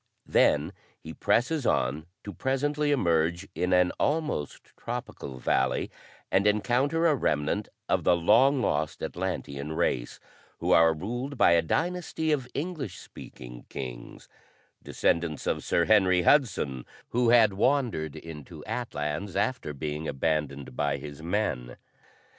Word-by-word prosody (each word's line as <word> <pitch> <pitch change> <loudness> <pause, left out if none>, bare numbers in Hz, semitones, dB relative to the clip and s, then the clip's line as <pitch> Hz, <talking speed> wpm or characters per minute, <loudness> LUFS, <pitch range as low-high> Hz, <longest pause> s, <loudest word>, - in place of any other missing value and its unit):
Then - - +3 0.3
he - - -9
presses 135 +5 +1
on 75 +6 0 0.2
to 100 - -7
presently 145 +3 0
emerge 85 - +1
in 90 +1 -1
an 90 -1 +4
almost 150 - -2
tropical 115 - -6
valley 65 0 0 0.4
and 100 +2 +3
encounter 125 +10 +2
a 160 - +5
remnant 85 - -1 0.2
of - - +1
the 90 - +4
long 120 +10 +4
lost 75 -1 -1
Atlantean 75 -5 -4
race, - - -1 0.4
who - - -1
are 80 0 +6
ruled 120 - -4
by 100 - +5
a 85 -1 +5
dynasty 165 - -1
of 135 -5 0
English 145 - -4
speaking - - -11
kings 60 -2 -8 0.5
descendants 85 -3 -1
of - - -1
Sir - - +2
Henry 95 -4 +4
Hudson, 90 - +2 0.3
who 120 0 +2
had 115 -4 +6
wandered 105 - 0
into 75 -4 -10
Atlans 95 -5 -4
after 125 -12 -1
being 75 +2 -4
abandoned 70 -2 -2
by 70 0 0
his 75 +1 -9
men. 80 -9 -2
90 Hz, 130 wpm, -28 LUFS, 75-125 Hz, 0.5 s, are